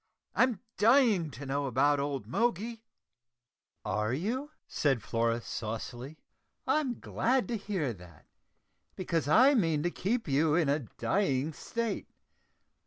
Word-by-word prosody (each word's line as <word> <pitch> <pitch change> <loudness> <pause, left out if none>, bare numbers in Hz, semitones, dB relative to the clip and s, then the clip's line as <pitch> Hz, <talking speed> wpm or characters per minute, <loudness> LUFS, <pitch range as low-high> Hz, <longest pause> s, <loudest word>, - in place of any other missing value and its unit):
I'm 250 -6 +2 0.2
dying 220 - +4
to 140 +2 -9
know 140 +1 -1
about 140 +3 +3
old 140 -1 -2
Moggy." 230 +2 -1 1.0
"Are 105 +2 0
you?" 240 - -2 0.2
said 135 -8 0
Flora 115 0 0
saucily. 120 +7 -6 0.5
"I'm 275 -6 0
glad 255 +2 0
to 235 - -1
hear 190 - -2
that, 90 -5 -15 0.7
because 170 -5 -1
I 255 - +6
mean 165 - +2
to 175 - 0
keep 225 +8 -1
you 150 +2 +2
in 165 -4 +2
a 145 +2 +2 0.2
dying 155 -6 0
state. 230 +5 -3
160 Hz, 125 wpm, -30 LUFS, 135-225 Hz, 1.0 s, I